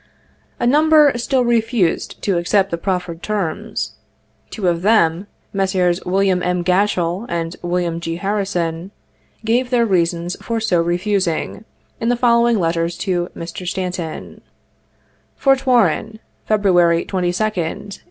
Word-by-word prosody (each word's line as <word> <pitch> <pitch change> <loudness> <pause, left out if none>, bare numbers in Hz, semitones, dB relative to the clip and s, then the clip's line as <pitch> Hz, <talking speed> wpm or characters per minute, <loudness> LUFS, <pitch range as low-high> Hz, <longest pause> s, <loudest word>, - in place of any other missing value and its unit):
A - - 0
number 300 +2 +5
still 250 +1 0
refused 230 -6 0
to 190 -4 +1
accept 195 +3 +1
the 170 - -1
proffered 180 -3 -3
terms. 200 -6 -3 0.6
Two 200 -5 -3
of 170 -1 +1
them, 190 -3 +2 0.3
Messrs. 185 -2 +1
Wm. 190 0 +2
H. 180 -1 -1
G 185 - +2
atchell 185 +1 0
and 170 0 -3
Wm. 175 -1 -1
G. 165 -1 -4
Harrison, 185 -3 -2 0.6
gave 245 +3 +1
their 240 -2 +3
reasons 175 -2 0
for 230 -1 -2
so 185 -6 +1
refusing, 180 +2 -1 0.3
in 230 - 0
the 245 - +3
following 235 -1 +3
letters 165 0 -1
to 180 -3 -1
Mr. 170 +2 -7
Stanton: 180 -3 -4 1.0
"Fort 270 -1 +2
Warren, 220 -2 +2 0.3
February 175 -5 +3
22d, - - -14
1862. 185 +1 -2
185 Hz, 130 wpm, -19 LUFS, 175-220 Hz, 1.0 s, number